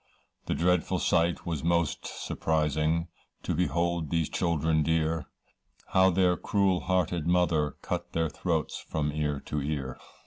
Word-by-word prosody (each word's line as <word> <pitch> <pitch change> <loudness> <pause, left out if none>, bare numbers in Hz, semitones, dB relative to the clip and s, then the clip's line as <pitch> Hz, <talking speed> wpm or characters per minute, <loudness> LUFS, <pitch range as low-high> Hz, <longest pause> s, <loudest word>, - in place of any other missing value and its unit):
The - - 0
dreadful 90 0 +2
sight 85 0 +1
was 80 -4 -3
most 85 -2 0
surprising, 80 +1 0 0.4
To - - -1
behold 85 -1 0
these 85 -3 0
children 80 -2 +1
dear, 80 -1 0 0.6
How 95 0 +5
their 90 0 +3
cruel 95 -1 +1
hearted 90 -3 0
mother, 85 -5 +2
Cut - - -4
their 80 0 +1
throats 80 -1 -2
from 75 -1 -1
ear 75 -1 -1
to 75 0 -3
ear. 70 -3 -3
80 Hz, 135 wpm, -28 LUFS, 75-85 Hz, 0.6 s, How